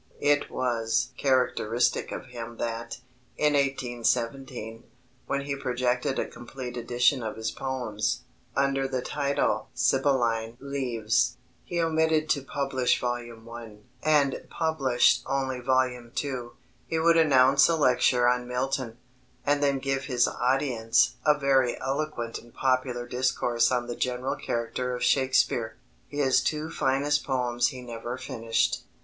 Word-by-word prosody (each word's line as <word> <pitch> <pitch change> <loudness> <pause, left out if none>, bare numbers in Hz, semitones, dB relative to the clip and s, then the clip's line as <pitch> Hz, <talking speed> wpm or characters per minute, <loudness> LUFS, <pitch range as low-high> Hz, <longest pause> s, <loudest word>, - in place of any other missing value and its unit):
It 145 0 +2
was 120 0 0
characteristic 125 -3 +1
of - - -6
him 120 -2 -8
that, 115 +1 -4 0.4
in 150 -1 +3
1817, 120 -3 -1 0.4
when 140 - 0
he 140 0 -3
projected 125 0 -1
a - - 0
complete 125 +1 -8
edition 120 +3 +2
of 110 -2 -4
his 110 0 -3
poems, 125 -6 -2 0.3
under 135 0 +1
the 130 -2 -2
title 140 -1 0
Sibylline 120 -4 +1
Leaves, 125 -3 0 0.3
he 175 - -3
omitted 160 -1 +2
to 140 - +1
publish 135 -2 0
Volume 120 -2 -4
I. 115 -2 -9 0.3
and 145 -3 +2
published 140 -7 +2
only 135 -1 -1
Volume 125 -1 0
II. 130 -4 -3 0.4
He 165 - -1
would 165 +1 +4
announce 135 -3 +5
a 165 - +3
lecture 125 -4 +3
on 125 0 +1
Milton, 125 -1 -2 0.5
and 145 0 +2
then 140 -1 +2
give 135 0 -2
his 125 -3 +2
audience 125 -3 +2
"a 150 -1 +5
very 135 -3 +2
eloquent 135 -4 -3
and 120 +1 -17
popular 130 -2 0
discourse 125 -1 +1
on 125 -1 0
the 120 0 -5
general 125 +1 -1
character 125 +2 -3
of 125 - -4
Shakespeare." 125 -4 +2 0.3
His 145 -3 +2
two 155 +1 -2
finest 145 +1 +1
poems 120 -2 +1
he 130 -3 -6
never 120 +1 -6
finished. 115 -2 -1
130 Hz, 130 wpm, -27 LUFS, 120-140 Hz, 0.5 s, announce